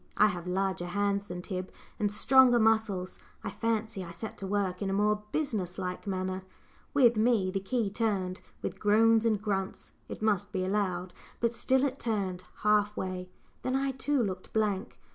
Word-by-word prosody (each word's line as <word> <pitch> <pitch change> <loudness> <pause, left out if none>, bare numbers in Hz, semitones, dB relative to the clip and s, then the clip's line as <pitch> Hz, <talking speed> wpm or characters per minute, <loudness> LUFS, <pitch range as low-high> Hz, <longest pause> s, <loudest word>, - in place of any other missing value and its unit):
I 210 - +7
have 180 -2 -5
larger 190 -1 -1
hands 200 +2 0
than 180 -1 -6
Tib, 185 -1 -4 0.3
and 205 -1 +1
stronger 250 +3 +6
muscles; 220 -5 +1 0.2
I - - -3
fancy 220 -3 -1
I 170 - -8
set 190 +6 -6
to 195 - -4
work 195 -2 -1
in 195 - -1
a - - 0
more 210 +1 +2
business 210 - -2
like 180 +1 -4
manner. 185 -1 -2 0.5
With 245 -5 +5
me 215 -4 +3
the 195 - -1
key 210 +1 -1
turned 195 -4 -1 0.2
with - - -4
groans 225 +2 +4
and 215 -3 +2
grunts, 195 -2 -3 0.2
it - - -6
must 205 -2 +1
be 185 -2 -1
allowed 185 -2 -1 0.3
but 235 0 +1
still 265 +3 +2
it 275 0 -2
turned 195 -5 -2 0.2
half 210 0 +3
way! 185 -1 -4 0.3
then 255 - -1
I 270 0 +1
too 265 0 0
looked 185 -3 -4
blank. 210 -1 -1
205 Hz, 180 wpm, -30 LUFS, 185-225 Hz, 0.5 s, I